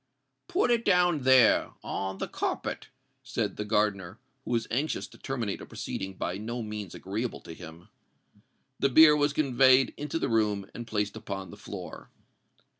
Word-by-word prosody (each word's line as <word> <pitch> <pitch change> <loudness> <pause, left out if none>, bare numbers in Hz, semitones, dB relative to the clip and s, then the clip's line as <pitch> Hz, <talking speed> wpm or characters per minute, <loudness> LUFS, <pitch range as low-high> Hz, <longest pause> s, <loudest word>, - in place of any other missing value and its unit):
"Put 360 -8 +1
it 235 -1 +2
down 180 -5 +3
there—on 120 -6 +2
the - - -3
carpet," - - -3 0.3
said 120 -6 -3
the 105 - -3
gardener, 105 -3 0 0.3
who - - -9
was 115 -1 +1
anxious 145 +6 -1
to - - -17
terminate 120 -7 -3
a - - -8
proceeding 95 0 -5
by 90 +1 -3
no 115 +2 -4
means 105 -4 -6
agreeable 110 +5 -4
to - - -9
him. 80 0 -12 0.9
The 140 - +3
bier 150 +3 +8
was 145 0 +2
conveyed 135 -2 +4
into 150 +2 -3
the - - -1
room, 105 -3 +1
and 120 0 -7
placed 105 -2 -1
upon 100 -4 -6
the - - -9
floor. 100 -3 -9
115 Hz, 160 wpm, -28 LUFS, 100-135 Hz, 0.9 s, bier